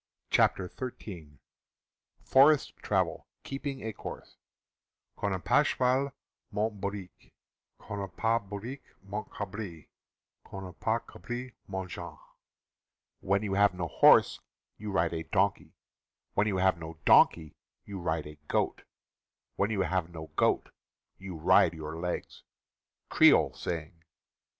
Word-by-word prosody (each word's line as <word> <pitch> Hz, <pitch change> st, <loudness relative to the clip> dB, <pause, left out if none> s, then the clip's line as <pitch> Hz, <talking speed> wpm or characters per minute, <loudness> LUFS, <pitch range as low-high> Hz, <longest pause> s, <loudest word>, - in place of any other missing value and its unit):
V -, -, -62 dB
CHAPTER 95 Hz, -, +3 dB
Xin 90 Hz, -, -8 dB, 0.9 s
FOREST 140 Hz, +2 st, +5 dB
TRAVEL— -, -, -1 dB, 0.2 s
KEEPING 135 Hz, 0 st, -5 dB
A 110 Hz, -, -3 dB
COURSE -, -, -9 dB, 0.8 s
Quand 100 Hz, -, -2 dB
na 95 Hz, -, 0 dB
pas 145 Hz, +10 st, +3 dB
choual, 130 Hz, +2 st, +1 dB, 0.4 s
monte 105 Hz, 0 st, -1 dB
hourique; 100 Hz, -2 st, -6 dB, 0.4 s
Quand 105 Hz, -, -7 dB
na 100 Hz, -, -3 dB
pas 115 Hz, +5 st, 0 dB
hourique, 115 Hz, +7 st, -7 dB
monte 100 Hz, +2 st, -5 dB
cdbri; 95 Hz, -, -6 dB, 0.6 s
Quand 95 Hz, 0 st, -8 dB
na 90 Hz, -, -8 dB
pas 110 Hz, +6 st, -1 dB
cabri, 120 Hz, +1 st, -6 dB
monte 95 Hz, -2 st, -5 dB
jamhe. 85 Hz, -4 st, -7 dB, 1.0 s
(When 100 Hz, +2 st, +1 dB
you 100 Hz, -2 st, -2 dB
have 100 Hz, -1 st, +4 dB
no 90 Hz, -2 st, -2 dB
horse, -, -, +6 dB, 0.4 s
you 105 Hz, 0 st, -5 dB
ride 85 Hz, -3 st, +1 dB
a 80 Hz, -, -2 dB
donkey; 80 Hz, -, 0 dB, 0.6 s
When 105 Hz, -, +2 dB
you 100 Hz, -3 st, 0 dB
have 95 Hz, -2 st, +3 dB
no 80 Hz, -1 st, -8 dB
donkey, 80 Hz, -2 st, +5 dB, 0.3 s
you 100 Hz, -1 st, -6 dB
ride 80 Hz, -3 st, -1 dB
a 75 Hz, 0 st, -11 dB
goat; -, -, 0 dB, 0.7 s
When 100 Hz, -, +1 dB
you 105 Hz, -3 st, 0 dB
have 90 Hz, -3 st, 0 dB
no 80 Hz, -2 st, -9 dB
goat, -, -, +2 dB, 0.5 s
you 95 Hz, -2 st, -7 dB
ride 85 Hz, 0 st, +4 dB
your 80 Hz, 0 st, -6 dB
legs.) 90 Hz, +2 st, -4 dB, 0.3 s
— -, -, -58 dB
Creole -, -, +6 dB
Saying. 80 Hz, 0 st, -5 dB
95 Hz, 135 wpm, -30 LUFS, 85-110 Hz, 1.0 s, horse